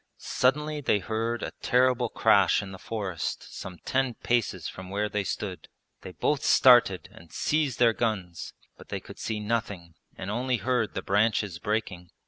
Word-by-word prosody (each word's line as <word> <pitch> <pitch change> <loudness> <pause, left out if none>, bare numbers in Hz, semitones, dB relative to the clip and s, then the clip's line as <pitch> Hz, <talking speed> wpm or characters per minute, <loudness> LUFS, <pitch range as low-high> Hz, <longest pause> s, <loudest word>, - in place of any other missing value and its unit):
Suddenly 150 +3 0
they 120 - +2
heard 115 +3 -2
a - - -4
terrible 125 -1 +2
crash - - +3
in 95 - -8
the 95 - -9
forest 100 -7 -4
some 90 -2 -7
ten 130 -2 0
paces 100 -8 -1
from 95 0 -8
where 105 +2 -1
they 105 -1 -2
stood. 95 -1 -5 0.3
They 95 - -9
both 145 - 0
started 120 -8 +5
and 85 -1 -16
seized 150 -5 0
their 120 -2 +4
guns, 95 -7 -3 0.2
but - - -14
they - - -3
could - - -13
see 110 -1 -3
nothing 105 -6 -3 0.2
and 95 - -5
only 125 +3 0
heard 120 0 -1
the - - -3
branches 105 -3 +1
breaking. 95 -4 -3
110 Hz, 165 wpm, -27 LUFS, 95-125 Hz, 0.3 s, started